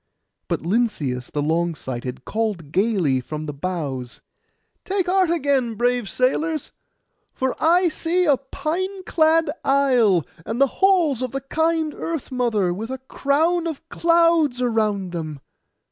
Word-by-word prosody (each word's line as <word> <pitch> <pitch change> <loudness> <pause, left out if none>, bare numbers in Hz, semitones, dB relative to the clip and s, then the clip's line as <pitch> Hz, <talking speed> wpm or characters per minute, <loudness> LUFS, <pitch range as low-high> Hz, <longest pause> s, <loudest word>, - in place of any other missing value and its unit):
But - - -1
Lynceus 165 - -1
the 145 - -2
long 165 +2 0
sighted 130 -1 -6
called 210 -9 -2
gaily 185 - +1
from 155 +4 -6
the 150 - -5
bows, 140 -6 -4 0.6
'Take 385 -1 0
heart 370 -1 +2
again, 275 -8 +1
brave 245 -2 0
sailors; 275 - 0 0.6
for 260 -1 -1
I 350 +3 +4
see 345 +3 0
a 285 -4 +4
pine 370 +8 -4
clad 320 -2 +3
isle, 250 - +3 0.2
and 225 +7 -4
the 275 - +6 0.2
halls 350 - +4
of 255 -1 -3
the 270 - -2
kind 320 +2 0
Earth 325 -5 -5
mother, 225 -8 +1
with 220 +6 -5
a 265 - -3
crown 310 +6 0
of 325 0 -6
clouds 335 -5 +3
around 215 -6 0
them. 155 -4 -5
250 Hz, 140 wpm, -22 LUFS, -, 0.6 s, the